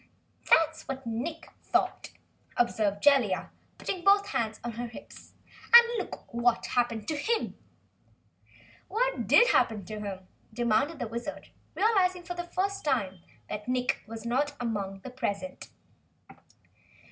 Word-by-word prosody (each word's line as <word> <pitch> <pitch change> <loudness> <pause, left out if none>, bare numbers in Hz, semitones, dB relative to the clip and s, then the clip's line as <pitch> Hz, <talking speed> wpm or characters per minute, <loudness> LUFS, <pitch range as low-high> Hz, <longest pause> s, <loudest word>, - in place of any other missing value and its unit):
"That's 320 0 +3
what 270 -1 -5
Nick 270 +9 -4
thought," - - 0 0.5
observed 210 -4 +1
Jellia, 260 -10 +3 0.3
putting 365 -3 -4
both 400 +1 +5
hands 225 -5 -2
on 240 - -3
her 240 +2 -5
hips. 230 - -13 0.4
"And 475 0 +11
look - - -8
what 235 0 +2
happened 235 -3 -1
to 310 - -1
him!" 450 +9 -1 1.3
"What - - -1
did 485 +1 +6
happen 210 -4 +2
to 215 +3 -6
him?" 190 -3 -6 0.2
demanded 240 +7 +1
the 245 - -3
Wizard, 235 +6 -6 0.3
realizing 370 -5 +2
for 355 - -5
the 350 0 -5
first 390 +3 -2
time 205 -11 0 0.3
that 210 +1 -6
Nick 250 0 0
was 225 0 -8
not 285 +5 0
among 200 -5 -3
those 255 - -9
present. 255 +1 -4
245 Hz, 135 wpm, -29 LUFS, 220-330 Hz, 1.3 s, And